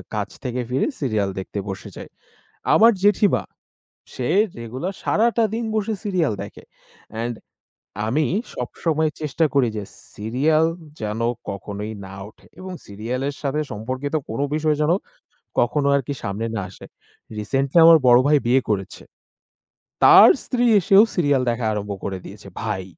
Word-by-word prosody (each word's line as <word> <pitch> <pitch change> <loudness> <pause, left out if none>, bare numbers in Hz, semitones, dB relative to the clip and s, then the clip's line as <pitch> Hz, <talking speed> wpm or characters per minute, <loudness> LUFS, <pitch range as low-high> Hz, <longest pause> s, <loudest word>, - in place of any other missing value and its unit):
কাছ 105 -1 -2
থেকে 125 -1 -2
ফিরে 130 +2 0
serial 110 -7 0
দেখতে 100 +2 -5
বসে 95 0 -6
যায়। - - -9 0.6
আমার 230 +2 +7
জেঠিমা, 205 0 +3 0.7
সে 125 - -3 0.3
রেগুলার 130 - -5
সারাটা 230 +1 +2
দিন 230 +1 -2
বসে 215 0 0
serial 180 - 0
দেখে। 100 - -11 0.6
And 120 0 -2 0.7
আমি 150 +7 +1 0.3
সবসময় 155 +5 -1
চেষ্টা 155 +1 0
করি 135 -4 +3
যে 105 - -4 0.3
Serial 140 +9 +1 0.3
যেন 110 +1 -3 0.3
কখনোই 100 +2 -6
না 95 - -10
ওঠে - - -21
এবং 185 0 -7
serial 110 +5 -4
এর 145 - -4
সাথে 145 +1 -1
সম্পর্কিত 130 +7 -4
কোন 115 +4 -4
বিষয় 155 -1 +1
যেন 150 +2 +3 0.7
কখনো 140 +4 +1
আরকি 140 0 -1
সামনে 100 +2 -3
না 105 - -1
আসে। 90 - -13 0.5
Recently 135 +8 -1
আমার 165 0 +9
বড় 120 0 +7
ভাই 150 0 +5
বিয়ে 130 +2 +4
করেছে। 95 -3 -3 1.0
তার - - +9 0.2
স্ত্রী 245 -1 0 0.2
এসেও 195 +2 +6
serial 145 -6 +2
দেখা 120 0 -3
আরম্ভ 105 -1 -3
করে 95 -1 -3
দিয়েছে। - - -11
ভাই, 95 0 -3
130 Hz, 145 wpm, -22 LUFS, 110-160 Hz, 1.0 s, আমার